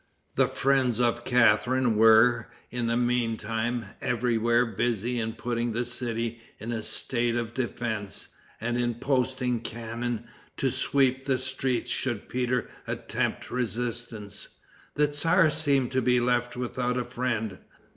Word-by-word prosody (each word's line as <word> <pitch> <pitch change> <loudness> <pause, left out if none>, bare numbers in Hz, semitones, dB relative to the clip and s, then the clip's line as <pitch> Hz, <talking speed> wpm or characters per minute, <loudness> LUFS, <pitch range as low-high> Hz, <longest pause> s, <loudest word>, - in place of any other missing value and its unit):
The - - +3
friends 130 -4 +2
of 120 -1 +1
Catharine 125 0 +3
were, 115 +2 +6 0.2
in 120 -1 -1
the 115 +1 +1
meantime, 120 -1 0 0.2
everywhere 120 0 +2
busy 120 +2 -1
in 110 0 -2
putting 120 0 -2
the 120 +2 -1
city 115 -1 -3 0.2
in 115 +2 -5
a 115 -2 -2
state 120 +2 0
of 120 -1 -2
defense, 115 -5 -3 0.3
and 120 +2 -1
in 120 -1 0
posting 125 -1 0
cannon 115 +1 -4 0.3
to 135 - +1
sweep 135 0 +1
the 135 -2 +2
streets 130 -1 -1
should 120 -6 -2
Peter 125 -1 0 0.2
attempt - - -2
resistance. 120 -3 -3 0.4
The 150 - +4
tzar 160 +3 +3
seemed 140 -5 +2
to 130 0 +1
be 125 0 +3
left 120 0 0
without 125 0 -1
a 125 - -1
friend. 120 -5 -2
120 Hz, 135 wpm, -27 LUFS, 115-125 Hz, 0.4 s, were